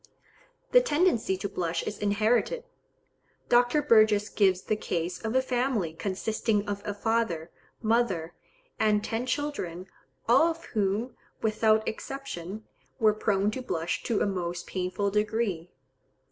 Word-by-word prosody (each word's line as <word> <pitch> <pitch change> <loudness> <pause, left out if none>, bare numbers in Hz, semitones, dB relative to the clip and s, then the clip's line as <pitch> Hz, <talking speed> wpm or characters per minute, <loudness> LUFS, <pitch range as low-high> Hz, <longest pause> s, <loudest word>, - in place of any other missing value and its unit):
The - - +7
tendency 295 - +2
to 200 - -3
blush 175 -4 -2
is 205 - -5
inherited. 220 - +1 0.9
Dr. 245 +4 +4
Burgess 215 -3 +4
gives 190 -3 +2
the 215 - 0
case 175 -3 -3
of 220 +2 -2
a 260 - +4
family 245 -9 0
consisting 205 +4 -1
of 200 0 -3
a 205 - -1
father, 205 -7 -1 0.3
mother, 220 -8 +1 0.5
and 210 -1 +3
ten 230 +3 -2
children, 235 - -3 0.4
all 260 +8 +6
of 335 0 -4
whom, 215 +2 -1 0.3
without 220 0 +2
exception, 220 -6 -6 0.3
were 215 -2 +5
prone 205 -1 +1
to 255 - -4
blush 165 -8 -2
to 225 - 0
a - - +3
most 175 -3 -3
painful 185 +2 -2
degree. 210 -5 -1
215 Hz, 130 wpm, -28 LUFS, 190-235 Hz, 0.9 s, The